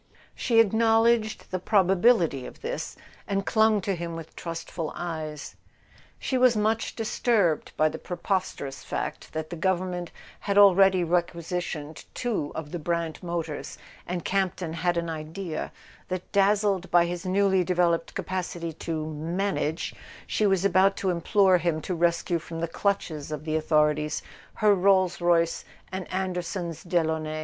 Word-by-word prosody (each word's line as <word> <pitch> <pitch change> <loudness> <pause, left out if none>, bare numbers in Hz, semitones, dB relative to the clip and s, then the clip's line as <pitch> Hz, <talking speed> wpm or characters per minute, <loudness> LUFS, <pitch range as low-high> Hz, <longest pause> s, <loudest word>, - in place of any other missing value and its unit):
She 230 -3 +2
acknowledged 225 0 +3
the 185 - -1
probability 185 - +3
of - - -13
this, 485 +2 -4 0.3
and 195 -1 -1
clung 220 -2 +3
to 195 - -1
him 170 -1 -4
with 165 -1 -9
trustful 165 -1 -5
eyes. 155 -4 -5 0.6
She 260 - -1
was 250 -3 +5
much 220 +2 0
disturbed 215 -6 +1
by 155 - +4
the 155 +1 -4
preposterous 180 -6 -3
fact - - -4
that 155 +1 -4
the - - -3
Government 180 0 -1 0.3
had 200 -1 -1
already 195 -2 +6
requisitioned 170 -2 -2
two 220 -12 -2
of 155 -2 -6
the 175 - -4
Brant 165 -1 -2
motors, 170 -3 -4 0.3
and 175 -1 -3
Campton 185 -3 -1
had 175 +1 0
an 170 0 -1
idea 160 +2 -5 0.4
that, 185 -1 -5
dazzled 200 -1 +2
by 175 0 +5
his 175 +1 -4
newly 190 0 +2
de¬ 180 +1 -1
veloped 170 -1 +1
capacity 175 -3 -3
to 155 0 -4
"manage," 160 +1 -2 0.3
she 215 - +1
was 195 -1 +2
about 195 0 +4
to 190 - -1
im¬ 170 -2 -2
plore 195 -4 +4
him 170 -2 0
to 180 - -4
rescue 170 0 +1
from 165 +1 -7
the 170 - -1
clutches 165 -5 -2
of 150 0 -5
the 155 -1 -1
authorities 150 -1 +1 0.3
her 210 -1 +4
Rolls 185 -2 +3
Royce 170 -1 +2 0.3
and 190 -1 -5
Anderson's 180 -2 -3
Delaunay. 160 -3 0
175 Hz, 150 wpm, -26 LUFS, 165-195 Hz, 0.6 s, already